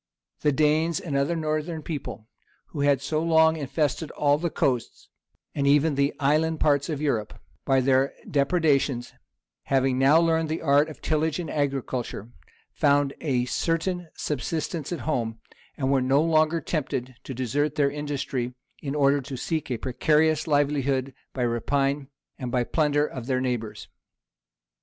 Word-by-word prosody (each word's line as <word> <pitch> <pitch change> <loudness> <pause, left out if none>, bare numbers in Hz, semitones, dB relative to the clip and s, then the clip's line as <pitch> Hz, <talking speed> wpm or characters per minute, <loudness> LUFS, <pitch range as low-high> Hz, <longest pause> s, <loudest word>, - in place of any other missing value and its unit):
The 150 - +2
Danes 155 +3 +2
and 150 -5 -4
other 140 +5 +1
northern 155 0 -2
people, 140 -8 -6 0.4
who 150 - -7
had 140 -1 +2
so 155 +2 -1
long 160 -1 +4
infested 150 +1 -1
all 145 0 +1
the 170 +1 -1
coasts, 125 -6 -2 0.4
and 140 -1 0
even 145 +2 +4
the 140 +1 +1
island 155 +3 +2
parts 145 -1 +2
of 150 -3 -2
Europe, 115 -8 -2 0.3
by 135 -1 +3
their 135 +1 +2
depredations, 140 -4 +1 0.5
having 135 -1 +1
now 140 +4 +6
learned 165 -1 +1
the 160 +1 -3
arts 145 +1 +4
of 155 - -12
tillage 155 0 0
and 170 -4 -4
agriculture, 130 -6 -3 0.4
found 145 -1 +2
a 130 -5 0
certain 170 +5 -1
subsistence 155 - -3
at 175 - -3
home, 115 -7 -2 0.4
and 135 -1 0
were 135 -1 +3
no 135 +2 +3
longer 160 0 +2
tempted 130 -5 -3
to 135 - -7
desert 140 +4 -1
their 140 -2 +2
industry, 140 -4 -3 0.3
in 140 0 -4
order 140 -1 +3
to 135 0 -7
seek 155 +4 -3
a 125 - -1
precarious 155 +6 +1
livelihood 140 -3 +1 0.2
by 125 - -2
rapine 135 +4 0 0.3
and 125 -2 -4
by 125 -1 +1
the - - -13
plunder 150 -2 +2
of 125 -5 -7
their 130 -2 +1
neighbors. 120 -4 -3
145 Hz, 155 wpm, -25 LUFS, 135-155 Hz, 0.5 s, now